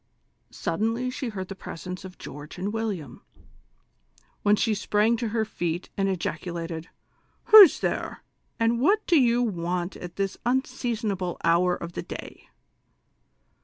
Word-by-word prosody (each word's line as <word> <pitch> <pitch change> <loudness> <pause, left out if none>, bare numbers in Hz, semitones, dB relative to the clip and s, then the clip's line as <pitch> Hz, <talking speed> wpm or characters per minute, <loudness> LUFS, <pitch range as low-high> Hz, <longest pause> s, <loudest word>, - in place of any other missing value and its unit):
Suddenly 225 +8 -1
she 260 -1 -4
heard 190 -4 -5
tlie 195 0 -9
presence 180 +2 -7
of 190 -1 -10
George 145 +2 -9
and 195 +4 -3
William, 195 - -4 1.2
when 210 0 +4
she 220 +1 +1
sprang 210 +2 +2
to 235 0 -2
her 220 0 0
feet 175 -4 -3
and 195 0 +1
ejaculated: 165 -2 -4 0.3
" - - -41
Who's 420 -6 +10
there? - - -2 0.4
and 230 +1 +2
what 410 +9 +3
do 335 -4 +5
you 240 0 +3
want 175 -3 -2
at 175 -1 -8
this 195 -1 -2
unseason 240 -3 -1
able 180 -2 -3
hour 175 +2 +3
of 170 - -7
the - - -4
day - - -9
195 Hz, 145 wpm, -26 LUFS, 175-230 Hz, 1.2 s, Who's